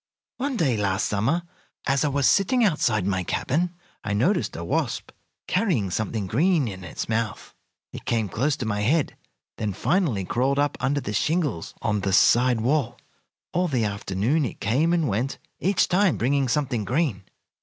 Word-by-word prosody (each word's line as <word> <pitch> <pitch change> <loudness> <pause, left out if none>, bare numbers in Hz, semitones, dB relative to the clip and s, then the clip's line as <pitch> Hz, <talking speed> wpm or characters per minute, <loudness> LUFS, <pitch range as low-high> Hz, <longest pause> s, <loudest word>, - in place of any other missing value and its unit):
"One 270 -1 -2
day 135 - +2
last 95 -2 0
summer, 120 +13 0 0.4
as 135 +1 +2
I - - +2
was 140 -2 +2
sitting 235 +6 +3
outside 115 - +1
my 95 -2 0
cabin, 170 - -1 0.3
I 105 - -2
noticed 175 - +1
a 85 - -5
wasp 85 - -2 0.3
carrying 175 - 0
something 110 +1 -2
green 150 - +2
in 95 -3 -7
its 85 - -5
mouth. 110 -1 -2 0.4
It - - -8
came 115 -3 0
close 130 +9 0
to 125 - -4
my 105 -2 -1
head, 145 +8 +1 0.4
then 105 -2 -2
finally 130 - 0
crawled 130 +7 0
up 145 0 +1
under 145 +1 0
the 105 - -4
shingles 150 - -1
on 105 -2 0
the 95 0 -1
side 120 +3 +4
wall. 125 -1 0 0.6
All 180 +1 +1
the 125 -8 0
afternoon 105 +8 0
it 125 - -4
came 135 +11 +1
and 170 -3 +2
went, 120 +5 -1 0.2
each 195 +1 +2
time 190 +1 +2
bringing 135 +2 +1
something 125 -5 0
green. 125 - 0
125 Hz, 170 wpm, -25 LUFS, 105-160 Hz, 0.6 s, side